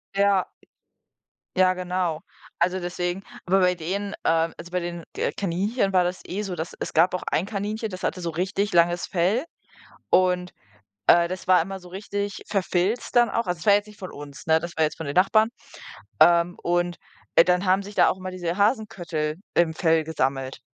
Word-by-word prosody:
Ja. 200 Hz, -1 st, +3 dB, 1.1 s
Ja 185 Hz, 0 st, +4 dB
genau. 180 Hz, -3 st, -2 dB, 0.4 s
Also, 180 Hz, +2 st, +1 dB
deswegen 175 Hz, +2 st, -3 dB, 0.2 s
aber 190 Hz, +2 st, +3 dB
bei 180 Hz, -1 st, +3 dB
denen, 195 Hz, +5 st, -3 dB
ähm 165 Hz, 0 st, +2 dB
also, 170 Hz, +1 st, -10 dB
bei 180 Hz, -, 0 dB
den 170 Hz, -1 st, -5 dB
K -, -, -1 dB
Kaninchen 195 Hz, +3 st, -1 dB
war 180 Hz, -1 st, +5 dB
das 180 Hz, +1 st, -3 dB
eh 195 Hz, +3 st, -3 dB
so, 195 Hz, -4 st, -4 dB
dass 165 Hz, 0 st, -5 dB
es -, -, -4 dB
gab 170 Hz, +4 st, +4 dB
auch 180 Hz, -, -2 dB
ein 170 Hz, -, +1 dB
Kaninchen, 215 Hz, +2 st, -3 dB
das 185 Hz, -, -7 dB
hatte 180 Hz, -, -2 dB
so 170 Hz, -1 st, -2 dB
richtig 195 Hz, +4 st, -1 dB
langes 175 Hz, 0 st, +3 dB
Fell 195 Hz, -, +1 dB, 0.6 s
und, 180 Hz, -1 st, +2 dB, 0.5 s
äh, 170 Hz, 0 st, +6 dB
das 185 Hz, 0 st, -6 dB
war 180 Hz, -3 st, +6 dB
immer 195 Hz, +2 st, -6 dB
so 180 Hz, -, -13 dB
richtig 200 Hz, +1 st, -4 dB
verfilzt 195 Hz, +4 st, -1 dB
dann 240 Hz, -1 st, +5 dB
auch. 230 Hz, -3 st, -1 dB
Also, 180 Hz, -1 st, -2 dB
das -, -, -9 dB
war 205 Hz, -, +7 dB
jetzt 205 Hz, +1 st, +1 dB
nicht 210 Hz, -1 st, -15 dB
von 185 Hz, -, -7 dB
uns, 145 Hz, +1 st, -10 dB
ne? 160 Hz, 0 st, +4 dB
Das 170 Hz, 0 st, -7 dB
war 160 Hz, -, +3 dB
jetzt 155 Hz, -, -2 dB
von 160 Hz, -, -5 dB
den 140 Hz, -, -4 dB
Nachbarn. 215 Hz, +4 st, +4 dB, 0.7 s
Ähm. 170 Hz, 0 st, +5 dB
Und, 175 Hz, 0 st, 0 dB, 0.4 s
äh, 165 Hz, -, +8 dB
dann 180 Hz, +2 st, +1 dB
haben 190 Hz, +2 st, +3 dB
sich 205 Hz, +1 st, -9 dB
da -, -, +5 dB
auch -, -, -2 dB
immer 185 Hz, 0 st, -6 dB
diese 175 Hz, 0 st, -3 dB
Hasenköttel 175 Hz, -, 0 dB, 0.2 s
im 165 Hz, -2 st, +2 dB
Fell 160 Hz, -2 st, +2 dB
gesammelt. 135 Hz, -4 st, -2 dB
180 Hz, 195 wpm, -24 LUFS, 170-195 Hz, 1.1 s, äh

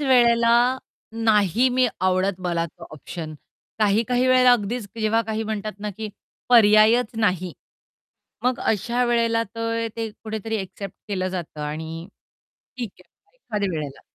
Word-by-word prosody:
वेळेला 235 Hz, -4 st, +4 dB, 0.7 s
नाही 215 Hz, +2 st, +4 dB
मी 255 Hz, -1 st, +5 dB
आवडत 185 Hz, 0 st, +1 dB
मला 170 Hz, -1 st, 0 dB
तो 165 Hz, -, -13 dB
ऑप्शन 155 Hz, +1 st, -7 dB, 0.4 s
काही-काही 230 Hz, +4 st, +2 dB
वेळेला 255 Hz, -1 st, +6 dB
अगदीच 230 Hz, 0 st, -1 dB
जेव्हा 220 Hz, +1 st, +2 dB
काही 220 Hz, 0 st, -2 dB
म्हणतात 215 Hz, -1 st, -3 dB
ना, 210 Hz, 0 st, -4 dB
की 215 Hz, +2 st, -6 dB, 0.4 s
पर्यायच 220 Hz, 0 st, +6 dB
नाही. 185 Hz, -5 st, 0 dB, 0.9 s
मग 250 Hz, 0 st, +1 dB
अशा 235 Hz, +4 st, 0 dB
वेळेला 230 Hz, -1 st, +2 dB
तर 230 Hz, 0 st, -1 dB
ते 225 Hz, -1 st, -3 dB
कुठेतरी 220 Hz, +1 st, -5 dB
एक्सेप्ट 195 Hz, -1 st, -7 dB
केलं 185 Hz, -2 st, -1 dB
जातं 175 Hz, -5 st, -6 dB
आणि 160 Hz, +3 st, -5 dB, 0.7 s
ठीक 240 Hz, -5 st, -4 dB
आहे -, -, -39 dB
एखाद्या 210 Hz, -, -3 dB
वेळेला. 150 Hz, -5 st, -5 dB
215 Hz, 130 wpm, -23 LUFS, 185-235 Hz, 0.9 s, वेळेला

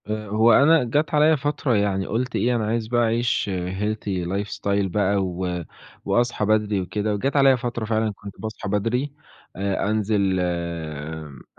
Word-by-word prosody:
آآ، 105 Hz, 0 st, -4 dB
هو 110 Hz, +3 st, +4 dB
أنا 150 Hz, +4 st, +5 dB
جات 150 Hz, +7 st, 0 dB
عليَّ 155 Hz, +1 st, +5 dB
فترة 140 Hz, -2 st, 0 dB
يعني 100 Hz, -2 st, +1 dB
قُلت 125 Hz, +3 st, -2 dB
إيه 120 Hz, +1 st, +1 dB
أنا 110 Hz, -2 st, 0 dB
عايز 115 Hz, 0 st, -1 dB
بقى 120 Hz, +1 st, +1 dB
أعيش 115 Hz, -2 st, 0 dB
Healthy 95 Hz, +1 st, -2 dB
life 100 Hz, +3 st, -2 dB
style 100 Hz, 0 st, 0 dB
بقى 100 Hz, +1 st, +1 dB
و 90 Hz, -1 st, -3 dB, 0.4 s
وأصحى 120 Hz, -3 st, +1 dB
بدري 105 Hz, -2 st, +1 dB
وكده، 105 Hz, +3 st, -2 dB
وجات 135 Hz, +8 st, -1 dB
عليَّ 135 Hz, -2 st, +6 dB
فترة 120 Hz, -2 st, -3 dB
فعلًا 110 Hz, 0 st, 0 dB
كنت 100 Hz, 0 st, -10 dB
باصحى 110 Hz, -2 st, -5 dB
بدري، 115 Hz, +8 st, 0 dB, 0.4 s
آآ، 100 Hz, +1 st, -1 dB
أنزل 105 Hz, -3 st, +1 dB
أ 80 Hz, -4 st, -4 dB
105 Hz, 160 wpm, -23 LUFS, 95-120 Hz, 0.4 s, عليَّ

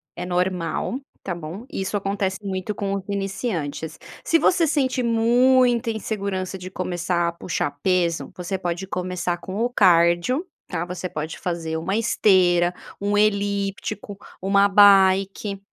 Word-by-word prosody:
é 175 Hz, -, -5 dB
normal, 180 Hz, +6 st, -1 dB, 0.2 s
tá 185 Hz, -, -3 dB
bom, 170 Hz, +7 st, -7 dB
isso 195 Hz, +2 st, -3 dB
acontece 195 Hz, -1 st, -1 dB
muito 190 Hz, +1 st, -3 dB
com 200 Hz, -1 st, -2 dB
os 195 Hz, -, -4 dB
iniciantes. 195 Hz, -, -3 dB, 0.3 s
Se 330 Hz, -, +4 dB
você 335 Hz, 0 st, +3 dB
sente 265 Hz, -4 st, +1 dB
muita 240 Hz, +1 st, +3 dB
insegurança 200 Hz, -3 st, -3 dB
de 185 Hz, 0 st, -8 dB
começar 175 Hz, -2 st, -1 dB
a -, -, -4 dB
puxar 170 Hz, -4 st, -3 dB
peso, 175 Hz, -3 st, 0 dB
você 180 Hz, +1 st, -3 dB
pode 175 Hz, 0 st, -3 dB
começar 180 Hz, -1 st, -2 dB
com 185 Hz, +3 st, -8 dB
o 240 Hz, -, +1 dB
cardio, 175 Hz, -, +3 dB, 0.2 s
tá, 175 Hz, -2 st, -3 dB
você 180 Hz, +1 st, -5 dB
pode 155 Hz, -2 st, -5 dB
fazer 165 Hz, -2 st, -3 dB
uma 185 Hz, +5 st, -2 dB
esteira, 180 Hz, -6 st, +3 dB, 0.3 s
um 205 Hz, +1 st, 0 dB
elíptico, 200 Hz, -1 st, -1 dB, 0.2 s
uma 200 Hz, +1 st, +4 dB
bike. 195 Hz, 0 st, +4 dB
190 Hz, 135 wpm, -23 LUFS, 175-205 Hz, 0.3 s, Se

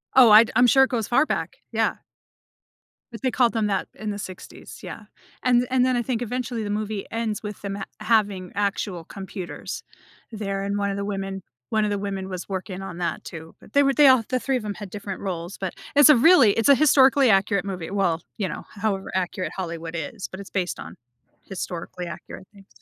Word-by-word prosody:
Oh, 250 Hz, -4 st, +8 dB
I'd 215 Hz, +2 st, +8 dB
I'm 250 Hz, 0 st, +6 dB
sure 265 Hz, +2 st, +6 dB
it 265 Hz, -, +1 dB
goes 230 Hz, -5 st, -1 dB
far 245 Hz, -, +3 dB
back. -, -, -3 dB
Yeah. -, -, +1 dB, 1.2 s
But 230 Hz, -, -8 dB
they 260 Hz, -, +1 dB
called 245 Hz, -2 st, +3 dB
them 220 Hz, -2 st, +1 dB
that 195 Hz, -2 st, -1 dB
in 215 Hz, -, -6 dB
the 205 Hz, -, -5 dB
60s, 185 Hz, -2 st, -9 dB
yeah, -, -, -8 dB, 0.4 s
and 245 Hz, -1 st, +3 dB
and 255 Hz, -1 st, +3 dB
then 255 Hz, -1 st, +2 dB
I -, -, +1 dB
think 240 Hz, -1 st, -2 dB
eventually 245 Hz, -1 st, -3 dB
the 205 Hz, -, -4 dB
movie 210 Hz, -1 st, -3 dB
ends 225 Hz, -2 st, -2 dB
with 210 Hz, -1 st, -7 dB
them 200 Hz, -1 st, -4 dB
ha 200 Hz, -, -5 dB, 0.2 s
having 205 Hz, -5 st, +1 dB
actual 200 Hz, -3 st, -2 dB
computers 190 Hz, 0 st, -7 dB, 0.5 s
there, 195 Hz, -2 st, -3 dB
and 200 Hz, +1 st, -2 dB
one 200 Hz, 0 st, 0 dB
of 195 Hz, -, -2 dB
the 200 Hz, -, -3 dB
women 195 Hz, -1 st, -4 dB, 0.3 s
1 220 Hz, -1 st, +1 dB
of 210 Hz, -, +1 dB
the 205 Hz, -, -1 dB
women 195 Hz, -1 st, -4 dB
was 185 Hz, +1 st, -6 dB
working 190 Hz, 0 st, -4 dB
on 185 Hz, -3 st, -7 dB
that 175 Hz, -, -2 dB
too, 160 Hz, 0 st, -9 dB
but -, -, -18 dB
they 285 Hz, -, +5 dB
were 275 Hz, 0 st, +3 dB
they 295 Hz, 0 st, +6 dB
all 260 Hz, -3 st, +6 dB
the 255 Hz, -1 st, +1 dB
3 270 Hz, 0 st, -1 dB
of 245 Hz, -, -2 dB
'em 205 Hz, -1 st, -4 dB
had 205 Hz, -3 st, -8 dB
different 200 Hz, -1 st, -6 dB
roles, 180 Hz, -1 st, -5 dB
but 190 Hz, -2 st, -4 dB, 0.2 s
it's 290 Hz, +1 st, +8 dB
a 300 Hz, -, +9 dB
really 265 Hz, -, +6 dB
it's 225 Hz, +5 st, +2 dB
a 280 Hz, -, +9 dB
historically-accurate 255 Hz, -9 st, +4 dB
movie, 185 Hz, -2 st, -5 dB
well, 175 Hz, -5 st, +1 dB, 0.2 s
you 200 Hz, -4 st, -1 dB
know, 160 Hz, -, -6 dB
however 200 Hz, -2 st, -2 dB
accurate 185 Hz, 0 st, -2 dB
Hollywood 170 Hz, -2 st, -5 dB
is, 170 Hz, +5 st, -5 dB
but 190 Hz, -, -9 dB
it's 200 Hz, -, -9 dB
based 185 Hz, -2 st, -2 dB
on -, -, -9 dB, 0.5 s
historically-accurate 180 Hz, 0 st, -7 dB
things. 195 Hz, -1 st, -17 dB
205 Hz, 215 wpm, -24 LUFS, 190-235 Hz, 1.2 s, a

